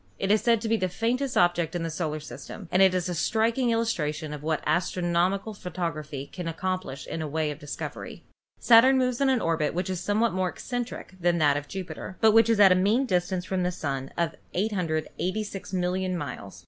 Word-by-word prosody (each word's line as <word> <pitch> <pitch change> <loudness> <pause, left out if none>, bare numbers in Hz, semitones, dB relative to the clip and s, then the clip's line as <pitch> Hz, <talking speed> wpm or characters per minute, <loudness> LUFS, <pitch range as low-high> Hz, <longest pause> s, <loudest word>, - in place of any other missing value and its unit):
It 195 - 0
is 215 - +4
said 230 -1 +3
to 225 - -3
be 225 +1 +2
the 185 -3 -1
faintest 240 +8 -1
object 175 -1 +2
in 175 - -1
the 165 - -3
solar 155 -2 -2
system, 150 - -9
and 185 - +3
is 185 -2 +4
a 180 - -2
striking 230 +8 +1
illustration 160 -10 -1
of 150 - -7
what 155 0 -1
astronomical 175 +5 0
photography 155 -7 -4
can 175 +3 -7
accomplish 185 -4 -3
in 165 - -5
the 155 - -3
way 155 0 -1
of 145 - -8
discovery. 145 0 -7 0.4
Saturn 245 +3 +7
moves 255 0 0
in 275 - +4
an 260 -2 +3
orbit 160 -2 0
which 180 +1 -1
is 185 - -2
somewhat 215 +4 +1
more 185 0 0
ec - - -12
centric 245 -5 -5
than 175 0 +2
that 145 -3 +4
of 145 0 -4
Jupiter, 185 +1 -7
but 220 - +6
which 225 +1 +5
is 225 -2 +3
at 195 -2 +8
a - - +8
mean 205 +8 +2
dis 180 -6 +1
tance 185 -1 -2
from 190 -1 -1
the 180 0 0
Sun 135 -5 -4
of 170 -1 0 0.2
886,000,000 185 0 -2
miles. 100 - -6
180 Hz, 205 wpm, -27 LUFS, 160-215 Hz, 0.4 s, at